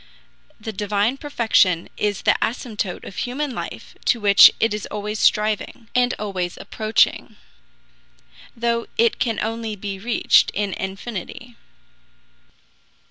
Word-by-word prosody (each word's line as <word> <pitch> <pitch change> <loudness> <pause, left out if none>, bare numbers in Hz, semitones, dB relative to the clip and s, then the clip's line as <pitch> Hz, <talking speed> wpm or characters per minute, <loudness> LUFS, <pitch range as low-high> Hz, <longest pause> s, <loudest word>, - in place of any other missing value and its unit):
The 220 0 -6
divine 210 +5 0
perfection 220 - +2
is 205 -1 -2
the - - +4
asymptote 220 -6 -3
of 190 - -10
human 265 +2 -3
life - - -7
to 240 - +2
which 200 -1 +8
it 225 -1 +2
is 210 - -4
always 210 +1 -4
striving, 215 +2 0
and 250 0 +2
always 185 -4 -4
approaching, 215 0 0 1.2
though 235 0 -1
it 230 0 +2
can 225 -3 0
only 225 0 -3
be 195 -1 -6
reached 230 +4 +3
in 200 -2 -1
infinity. 205 +4 -6
215 Hz, 120 wpm, -22 LUFS, 205-235 Hz, 1.2 s, which